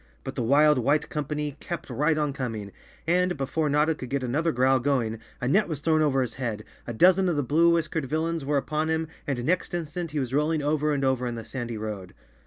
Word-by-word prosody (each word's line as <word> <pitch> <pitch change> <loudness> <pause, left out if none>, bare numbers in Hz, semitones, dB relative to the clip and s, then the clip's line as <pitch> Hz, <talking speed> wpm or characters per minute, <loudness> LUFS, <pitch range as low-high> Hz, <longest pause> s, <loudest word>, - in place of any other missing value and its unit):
But - - -5
the - - -3
wild 145 +4 +4
white 145 +5 +1
company 150 -1 -3
kept 170 -2 -5
right 150 +5 +1
on 150 -2 0
com¬ 125 -5 -3
ing 100 -1 -8 0.3
and, 180 +1 +2
before 145 +3 -1
Notta 150 +3 +3
could 130 -5 -8
get 140 -1 -1
another 150 +7 0
growl 130 +2 +3
going, 120 -4 0 0.2
a 125 - -2
net 200 +11 +3
was 155 -5 -4
thrown 155 +1 +2
over 135 -3 +2
his 125 - -5
head, 115 -5 -4 0.2
a - - -3
dozen 185 +9 +4
of 170 - 0
the 145 - 0
blue 160 +6 +4
whiskered 160 -3 0
villains 160 +3 -1
were 145 +1 +1
upon 155 +3 -1
him 160 0 0 0.2
and 125 -4 -2
next 180 +1 0
instant 170 +1 -4
he 150 0 -2
was 130 -2 -3
rolling 150 +1 +1
over 150 +1 +1
and 140 -2 0
over 130 -1 +1
in 120 - -3
the 115 -1 -7
sandy 120 -1 -5
road. 105 -4 -6
145 Hz, 230 wpm, -26 LUFS, 125-160 Hz, 0.3 s, wild